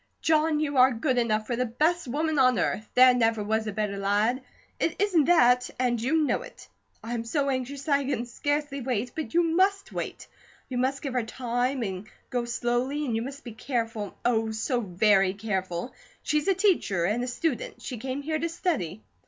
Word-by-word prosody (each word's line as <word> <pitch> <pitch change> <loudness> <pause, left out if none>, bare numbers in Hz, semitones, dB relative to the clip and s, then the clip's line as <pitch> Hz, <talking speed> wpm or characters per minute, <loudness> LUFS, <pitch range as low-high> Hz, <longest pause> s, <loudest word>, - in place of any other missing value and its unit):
"John, 315 -1 +2
you 290 -2 -1
are 255 +1 +7
good 250 +2 0
enough 215 -2 0
for 240 - -2
the 250 +1 0
best 310 +8 0
woman 305 +4 0
on 255 -3 +4
earth. 210 +3 -1
There 255 0 +8
never 225 -3 +1
was 220 +1 -1
a - - -1
better 205 -1 -2
lad, 210 +6 +1 0.4
it 325 - 0
isn't 370 -7 +3
that, 250 -7 +4
and 245 -2 0
you 310 +6 +2
know 295 - 0
it. - - -12 0.4
I 230 - -4
am 230 -1 -2
so 275 +4 0
anxious 265 +2 -3
that 280 -2 +2
I 280 - -3
can 260 -3 -1
scarcely 290 +3 -2
wait; 245 -1 -2
but 320 +1 -5
you 345 - +5
must 380 +4 +1
wait. - - -5 0.4
You 250 -2 -2
must 270 +3 -1
give 275 -3 -3
her 250 - +1
time 245 +2 -2
and 190 0 -5 0.2
go 245 -1 -1
slowly, 245 +5 -1
and 235 -5 -1
you 225 - 0
must 270 +3 -7
be 240 - -8
careful, 225 -3 -3
oh, 225 -2 +2
so 220 +3 -1
very 195 -1 +3
careful! 190 -1 -3 0.3
She's 300 +2 0
a 390 - +4
teacher 345 - +2
and 215 +6 0
a - - -3
student; 250 +2 -3
she 250 - -5
came 265 +3 -4
here 310 +1 -1
to 335 - -1
study." 245 - -2
250 Hz, 200 wpm, -27 LUFS, 225-290 Hz, 0.4 s, There